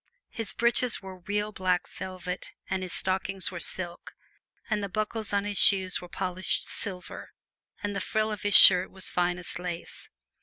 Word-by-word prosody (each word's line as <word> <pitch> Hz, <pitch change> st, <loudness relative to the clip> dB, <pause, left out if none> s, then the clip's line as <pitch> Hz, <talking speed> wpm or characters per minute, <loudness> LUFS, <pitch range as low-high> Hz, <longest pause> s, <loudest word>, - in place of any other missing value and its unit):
His 225 Hz, -2 st, -1 dB
breeches 235 Hz, -1 st, +1 dB
were 190 Hz, -1 st, -10 dB
real 205 Hz, +3 st, -3 dB
black 185 Hz, -3 st, -1 dB
velvet 185 Hz, -1 st, -7 dB
and 190 Hz, -, -2 dB
his 185 Hz, -1 st, -6 dB
stockings 190 Hz, 0 st, -2 dB
were 175 Hz, -, -6 dB
silk, 175 Hz, +1 st, -6 dB, 0.5 s
and 215 Hz, -2 st, -1 dB
the 200 Hz, -, -4 dB
buckles 215 Hz, +1 st, -3 dB
on 200 Hz, 0 st, 0 dB
his 205 Hz, -1 st, -2 dB
shoes 190 Hz, -2 st, +4 dB
were 180 Hz, -, -11 dB
polished 185 Hz, +1 st, -3 dB
silver 185 Hz, -4 st, -6 dB, 0.5 s
and 205 Hz, -1 st, -3 dB
the -, -, -2 dB
frill 215 Hz, 0 st, -1 dB
of 210 Hz, -, -6 dB
his 205 Hz, -1 st, +8 dB
shirt 185 Hz, 0 st, +9 dB
was 190 Hz, -1 st, -3 dB
finest 175 Hz, 0 st, -2 dB
lace. 175 Hz, -1 st, -7 dB
190 Hz, 165 wpm, -27 LUFS, 180-205 Hz, 0.5 s, shirt